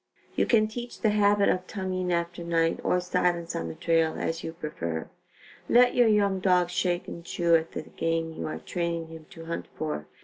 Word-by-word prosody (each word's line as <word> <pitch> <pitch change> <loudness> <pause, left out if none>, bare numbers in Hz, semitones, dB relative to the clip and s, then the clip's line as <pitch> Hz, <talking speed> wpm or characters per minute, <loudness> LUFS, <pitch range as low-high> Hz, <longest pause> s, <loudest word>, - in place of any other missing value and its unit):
You - - +2
can 215 -3 +4
teach 240 +2 -7
the 215 - +3
habit 205 -1 +4
of 185 0 0
tongueing 185 -3 -2
after 170 0 -1
night 165 -1 +1
or 180 - +2
silence 180 -1 0
on 80 - -2
the 80 - -6
trail 165 -1 +1
as 165 +1 -2
you 160 - -4
prefer. 85 - -4 0.6
Let 245 +1 +6
your 245 -2 +5
young 200 -3 +3
dog 180 -2 +3
shake 175 -1 0
and 170 - -7
chew 170 -1 +2
at 160 0 0
the - - -4
game 165 0 -2
you - - -5
are 155 - -4
training 170 -2 -3
him 160 -1 -11
to 165 -1 -11
hunt 170 +1 -4
for. 150 - -4
170 Hz, 200 wpm, -27 LUFS, 165-190 Hz, 0.6 s, Let